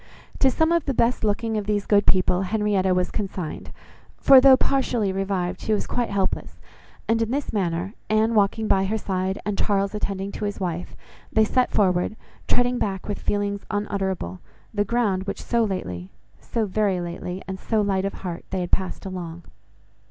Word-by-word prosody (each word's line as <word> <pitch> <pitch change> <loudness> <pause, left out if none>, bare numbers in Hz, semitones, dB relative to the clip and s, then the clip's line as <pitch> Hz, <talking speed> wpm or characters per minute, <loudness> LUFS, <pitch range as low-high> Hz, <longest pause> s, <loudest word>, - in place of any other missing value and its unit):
To 270 - +5
some 320 +5 +2
of 340 -2 +2
the 275 - -1
best 235 +1 +2
looking 220 +1 0
of 205 - -6
these 205 -1 0
good 205 -1 +3
people 185 -1 +3
Henrietta 200 -1 +1
was 180 0 0
consigned, 190 -5 -4 0.5
for, 270 -1 +8
though 265 -1 +8
partially 245 -7 +1
revived, 190 -2 -2
she 220 - 0
was 210 - 0
quite 245 -1 -1
helpless; 195 -2 -2 0.5
and 225 0 +2
in 225 - 0
this 280 +3 -2
manner, 180 -1 -1 0.2
Anne 215 +1 +3
walking 215 +1 +2
by 195 -1 +3
her 215 +3 0
side, 190 -2 -2
and 205 -1 -2
Charles 200 -1 +1
attending 200 -2 -3
to 210 - -4
his 205 - -3
wife, 175 -2 -3 0.4
they 220 0 +4
set 250 +3 +2
forward, 185 0 +2 0.3
treading 245 0 +2
back 190 -2 -2
with 205 -2 -3
feelings 205 -1 -1
unutterable, 190 - -2 0.3
the 205 -1 +2
ground, 205 -4 0
which - - -4
so 235 -1 +2
lately, 90 - -3 0.3
so 230 -2 -2
very 200 -2 +1
lately, 175 +1 -5
and 190 0 -5
so 220 +2 0
light 195 -2 +1
of 195 - -2
heart, 170 -2 -4
they 185 - -2
had 175 - -4
passed 190 +1 -1
along. 175 -3 -6
200 Hz, 180 wpm, -24 LUFS, 185-220 Hz, 0.5 s, for